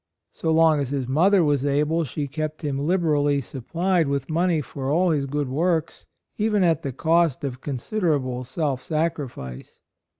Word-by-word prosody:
So 160 Hz, -, -2 dB
long 160 Hz, -1 st, +4 dB
as 140 Hz, -3 st, -2 dB
his 135 Hz, -3 st, -2 dB
mother 175 Hz, +8 st, +4 dB
was 145 Hz, -3 st, +1 dB
able 150 Hz, +3 st, +1 dB
she 145 Hz, +2 st, -4 dB
kept 155 Hz, +2 st, -4 dB
him 140 Hz, -2 st, -1 dB
liberally 145 Hz, -3 st, +2 dB
supplied 165 Hz, +7 st, -1 dB
with 140 Hz, +3 st, -2 dB
money 170 Hz, 0 st, +2 dB
for 135 Hz, -1 st, -5 dB
all 175 Hz, +4 st, +3 dB
his 140 Hz, -3 st, 0 dB
good 145 Hz, 0 st, -2 dB
works, 160 Hz, +4 st, -1 dB, 0.3 s
even 210 Hz, -2 st, +2 dB
at 165 Hz, -3 st, +2 dB
the 140 Hz, -, -3 dB
cost 160 Hz, 0 st, +1 dB
of 130 Hz, -2 st, -4 dB
considerable 140 Hz, -, -1 dB
self 130 Hz, 0 st, -2 dB
sacrifice. 150 Hz, -, -4 dB
150 Hz, 160 wpm, -24 LUFS, 140-165 Hz, 0.3 s, long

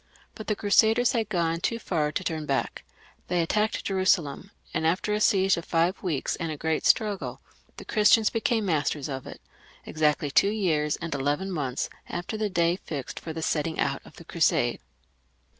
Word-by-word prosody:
But 215 Hz, -, -9 dB
the 210 Hz, -, +1 dB
Crusaders 220 Hz, +4 st, +4 dB
had 225 Hz, -4 st, -1 dB
gone 165 Hz, -4 st, 0 dB
too 230 Hz, +6 st, -1 dB
far 160 Hz, -9 st, -1 dB
to 185 Hz, -, -3 dB
turn 160 Hz, -4 st, -3 dB
back; 135 Hz, -1 st, -2 dB, 0.4 s
they 175 Hz, 0 st, 0 dB
attacked 210 Hz, +6 st, 0 dB
Jerusalem, 185 Hz, -4 st, +1 dB, 0.2 s
and 160 Hz, 0 st, +1 dB
after 185 Hz, +5 st, 0 dB
a 210 Hz, -, 0 dB
siege 195 Hz, -2 st, +3 dB
of 170 Hz, -, -5 dB
five 170 Hz, +3 st, +1 dB
weeks 165 Hz, -8 st, -1 dB
and 165 Hz, -2 st, -3 dB
a 155 Hz, -, -5 dB
great 160 Hz, +1 st, 0 dB
struggle, 210 Hz, -3 st, +1 dB, 0.4 s
the -, -, -9 dB
Christians 215 Hz, 0 st, +4 dB
became 225 Hz, -1 st, 0 dB
masters 150 Hz, -4 st, 0 dB
of 135 Hz, -2 st, -5 dB
it, -, -, -9 dB, 0.5 s
exactly 150 Hz, -2 st, 0 dB
two 200 Hz, -, +4 dB
years 160 Hz, -8 st, 0 dB
and 170 Hz, -1 st, -5 dB
eleven 145 Hz, +8 st, -1 dB
months 140 Hz, -7 st, -2 dB, 0.2 s
after 175 Hz, +5 st, -4 dB
the 215 Hz, -1 st, -1 dB
day 170 Hz, -1 st, +1 dB
fixed 145 Hz, -8 st, -6 dB
for 165 Hz, -, -7 dB
the 160 Hz, 0 st, -5 dB
setting 160 Hz, +1 st, -1 dB
out -, -, 0 dB
of -, -, -16 dB
the -, -, -13 dB
Crusade. -, -, +1 dB
170 Hz, 180 wpm, -26 LUFS, 155-205 Hz, 0.5 s, Crusaders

